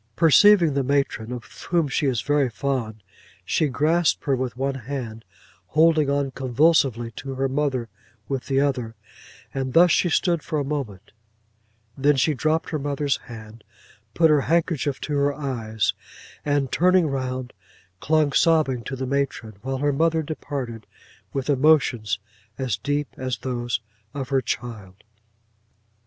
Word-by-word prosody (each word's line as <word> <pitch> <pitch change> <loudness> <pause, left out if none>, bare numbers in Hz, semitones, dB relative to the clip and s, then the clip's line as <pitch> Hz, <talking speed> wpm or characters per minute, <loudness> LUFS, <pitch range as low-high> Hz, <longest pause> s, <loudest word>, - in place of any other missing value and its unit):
Perceiving 170 0 +6
the 140 - +1
matron, 135 -4 -1
of 125 -2 -5 0.3
whom 170 -3 +2
she 140 +2 0
is 125 -4 0
very 145 -3 +1
fond, 115 -4 -3 0.4
she 155 - +1
grasped 155 +5 +1
her 140 - +2
with 125 -1 -4
one 135 +1 -1
hand, 120 -4 -6 0.4
holding 155 -2 +3
on 140 -1 0
convulsively 130 -3 +2
to 135 +3 -7
her 135 +1 0
mother 135 -3 -1 0.4
with 135 -2 -3
the 135 -1 +2
other; 130 -5 -1 0.6
and 130 -2 -3
thus 175 +2 +6
she 175 - +3
stood 170 0 +1
for 155 - -3
a 145 - 0
moment: 125 -9 -5 0.8
then 145 +2 +3
she 145 +4 +2
dropped 155 +4 0
her 155 - -1
mother's 145 0 -1
hand; 110 -2 -11 0.5
put 160 -2 +5
her 150 -2 +4
handkerchief 155 -3 0
to 150 - -3
her 140 0 +1
eyes; 115 -7 -2 0.5
and 145 -3 0
turning 180 0 +4
round, 130 -3 -3 0.5
clung 155 +2 +2
sobbing 155 -7 +2
to 135 - -5
the 130 0 -4
matron; 135 -5 -2
while 135 0 -3
her 145 +1 +1
mother 160 +2 +1
departed, 135 -7 -5 0.4
with 135 -2 -3
emotions 135 -7 +3 0.4
as 130 -6 -1
deep 145 +7 -2
as 130 -1 -3
those 120 -2 -3 0.3
of 135 -2 -4
her 135 -1 +2
child. 105 -4 -6
135 Hz, 145 wpm, -23 LUFS, 125-150 Hz, 0.8 s, Perceiving